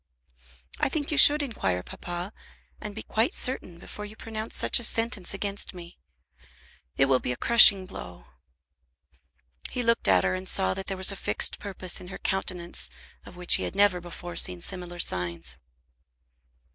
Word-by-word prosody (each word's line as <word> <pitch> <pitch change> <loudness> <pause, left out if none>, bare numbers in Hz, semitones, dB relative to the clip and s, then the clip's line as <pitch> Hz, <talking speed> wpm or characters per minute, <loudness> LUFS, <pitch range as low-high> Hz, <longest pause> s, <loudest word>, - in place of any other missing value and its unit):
"I - - 0
think 295 +1 -4
you 300 - -2
should 295 0 +9
inquire, 95 - -3
papa, 175 +3 -8 0.5
and 210 -1 -8
be 220 - -7
quite 225 +3 -1
certain 185 -9 0
before 210 +4 -8
you 210 +1 -10
pronounce 220 0 -5
such - - +4
a - - -4
sentence 225 -4 +1
against 200 -1 -4
me. 175 -1 -12 1.0
It 135 - +3
will 135 -1 +1
be 125 - -4
a 125 - -5
crushing 205 - +7
blow." 90 - -11 1.4
He 250 - -4
looked 230 0 0
at 95 -2 +3
her, 95 - -1
and 95 0 -5
saw 95 0 0
that 195 - -8
there 195 - -5
was 190 +2 +3
a - - -6
fixed - - 0
purpose 190 -3 -3
in 180 - -12
her 190 - -9
countenance 180 -2 -4 0.4
of - - -13
which 180 -1 +3
he - - -5
had - - -5
never 200 -3 +2
before 175 0 -9
seen 90 -1 +2
similar 180 -2 -8
signs. 85 - -2
185 Hz, 170 wpm, -25 LUFS, 170-215 Hz, 1.4 s, should